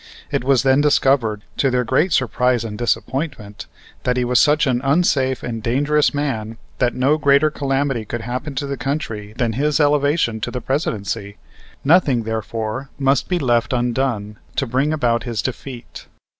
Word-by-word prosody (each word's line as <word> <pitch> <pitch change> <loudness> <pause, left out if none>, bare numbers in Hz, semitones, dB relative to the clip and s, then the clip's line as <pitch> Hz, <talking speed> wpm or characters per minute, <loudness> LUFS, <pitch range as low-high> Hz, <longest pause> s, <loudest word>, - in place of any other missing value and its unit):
It - - 0
was 135 -1 +3
then 135 +1 +4
discovered, 135 -7 +2
to 135 - +2
their 125 -1 +1
great 145 +9 +1
surprise 125 -3 +1
and 110 -2 -5
disappointment, 120 -1 -3 0.3
that 125 0 0
he 125 - +1
was 125 0 +3
such 150 +1 +4
an 125 -3 +1
unsafe 135 -3 +1
and 115 -2 -4
dangerous 145 +6 +2
man 115 -7 -3 0.2
that 125 -2 +1
no 140 +5 +2
greater 145 +1 +4
calamity 135 -4 -1
could 115 +2 -5
happen 130 +5 -5
to 140 - -2
the 140 0 -4
country 125 -8 -4
than 115 -2 0
his 145 +5 +1
elevation 145 -5 +2
to - - -2
the 125 - -4
Presidency. 110 - -3 0.5
Nothing, 140 -6 +3
therefore, 110 +3 -4
must 135 -1 +1
be 180 - +1
left 120 -6 +1
undone 120 -4 -1 0.2
to 135 - 0
bring 130 +5 0
about 120 -6 +1
his 115 -4 -4
defeat. 125 0 -7
130 Hz, 165 wpm, -20 LUFS, 115-140 Hz, 0.5 s, then